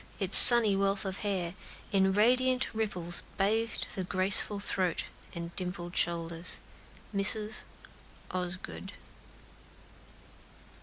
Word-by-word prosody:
its 195 -1 +1
sunny 230 -5 +10
wealth 195 0 -5
of 190 0 -8
hair, 185 -5 -7 0.4
In 190 -1 -2
radiant 255 +5 -2
ripples 185 -6 -5 0.2
bathed 220 +4 -4
the 190 - -8
graceful 190 +2 0
throat 185 -4 -6 0.3
And 170 0 -11
dimpled 180 -1 -9
shoulders." 170 0 -6 0.6
MRS. 210 +2 +1 0.7
OSGOOD. 185 +1 -9
195 Hz, 95 wpm, -25 LUFS, 180-210 Hz, 0.7 s, sunny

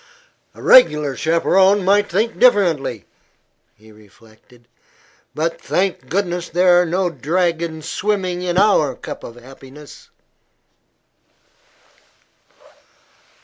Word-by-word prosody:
"A - - -13
reg'lar 150 - +4
chaperone 190 +6 +1
might 205 +1 +2
think 220 +6 -2
differently," 170 - +1 0.7
he 110 +1 -20
reflected; 110 +3 -22 0.7
"but 165 +2 -3
thank 180 -9 -3
goodness 175 -1 -3
there 175 +1 +3
are 180 - -2
no 180 +1 -1
dragons 165 -1 -3
swimming 185 -3 -3
in 180 -1 -3
our 185 -10 +2
cup - - -9
of 115 - -10
happiness." 135 +3 -15
170 Hz, 95 wpm, -18 LUFS, 135-190 Hz, 0.7 s, reg'lar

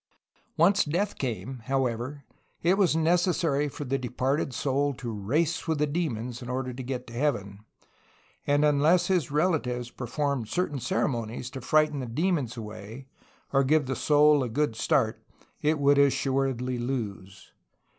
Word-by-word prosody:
Once 190 +5 +5
death 180 +7 -1
came, 125 0 -4
however, 130 +1 -2 0.4
it 175 +3 +4
was 195 -5 +3
necessary 165 -3 +2
for 145 - -7
the 135 0 -1
departed 130 +3 -1
soul 140 +3 0
to 120 -1 -5
race 140 +14 -1
with 160 -1 +1
the 150 - +2
demons 125 -7 -3
in 120 - -7
order 130 0 -2
to 130 - -6
get 125 0 -4
to 115 - -12
heaven, 105 -7 -1 0.9
and 145 +1 +3
unless 155 +5 +3
his 180 -7 +1
relatives 145 -6 0
performed 130 -1 -2
certain 150 +1 -1
cere 190 +9 0
monies 120 -1 -4
to 135 - -7
frighten 155 +2 +2
the 130 - -4
demons 140 -2 -1
away 110 +3 -8 0.5
or 135 0 +4
give 150 +2 +3
the 135 0 -2
soul 150 0 +4
a 125 - -2
good 145 0 0
start 110 0 +1 0.4
it 155 +1 +2
would 140 0 +4
assuredly 135 -2 +1
lose. 110 -7 -5
135 Hz, 155 wpm, -27 LUFS, 120-150 Hz, 0.9 s, Once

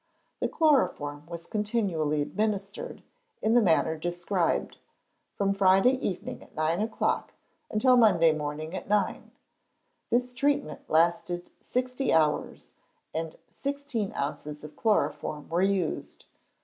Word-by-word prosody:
The - - +1
chloroform 150 - +1
was 170 0 -7
continually 195 -9 0
administered, 205 +3 -3 0.4
in 220 - +1
the 240 - +6
manner 160 -4 +3
described, 175 +2 -1 0.6
from 200 -1 +1
Friday 195 +7 +4
evening 190 -8 -4
at - - -17
nine 160 +4 +1
o'clock 220 +1 -1 0.4
until 250 +4 +4
Monday 180 -9 +6
morning 155 +1 -4
at - - -6
nine. 210 -1 0 0.8
This 250 +1 +1
treatment 280 - -1
lasted 170 +2 +1
sixty 255 +1 -1
hours, 155 -2 +1 0.4
and 160 0 -4
sixteen 280 -7 -3
ounces 150 +1 -4
of 150 - -10
chloroform 205 -8 0
were 170 +2 +1
used. 190 -4 -1
190 Hz, 115 wpm, -28 LUFS, 160-225 Hz, 0.8 s, the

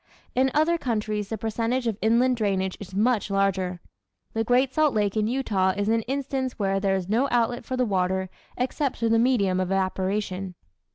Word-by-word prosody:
In 260 +1 +3
other 330 +3 +3
countries 215 -5 -2
the 220 - -3
percentage 230 +4 -1
of 225 -3 0
inland 240 +4 +3
drainage 190 -3 0
is 190 -2 -9
much 215 0 +1
larger. 190 -3 0 0.5
The 225 - 0
great 250 +3 +2
Salt 310 -4 +2
Lake 205 -1 +1
in 215 -1 +1
Utah 205 -7 +1
is 205 +1 0
an 225 0 +2
instance 265 -1 -2
where 195 -2 0
there 195 -1 +1
is 185 -2 -3
no 235 +7 +2
outlet 240 0 0
for 255 - -3
the 250 - +2
water 190 -2 0 0.3
except 260 +2 -1
through 230 - 0
the 225 0 +4
medium 210 -7 +2
of 185 - 0
evaporation. 190 0 -1
220 Hz, 185 wpm, -25 LUFS, 195-250 Hz, 0.5 s, the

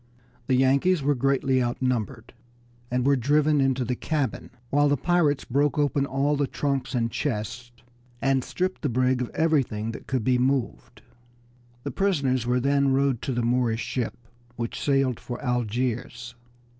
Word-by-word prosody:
The 130 - +3
Yankees 140 +6 +3
were 145 +1 +3
greatly 135 0 +1
outnumbered, 120 -1 -2 0.6
and 125 0 0
were 140 0 +4
driven 145 +3 +2
into 135 -2 +1
the 125 - -1
cabin, 140 - -2 0.2
while 145 +1 +3
the 145 - +2
pirates 165 -2 +1
broke 145 +4 +1
open 145 -1 +1
all 140 +3 +1
the 140 -1 0
trunks 135 -2 -2
and 115 -1 0
chests, 120 -1 -3 0.5
and 135 -1 +1
stripped 185 +6 -3
the 145 - 0
brig 130 +1 +1
of 125 - -3
everything 135 -9 +1
that - - -10
could 130 -4 -1
be 125 +1 +2
moved. 130 -1 -2 0.8
The - - -3
prisoners 140 - 0
were 125 +1 +2
then 140 +1 +2
rowed 135 -2 +1
to - - -3
the 120 -1 -1
Moorish 120 -1 +1
ship, 125 -3 -3 0.4
which 115 -1 -4
sailed 135 -4 +1
for 120 -1 -6
Algiers. 125 0 -2
130 Hz, 155 wpm, -25 LUFS, 125-140 Hz, 0.8 s, were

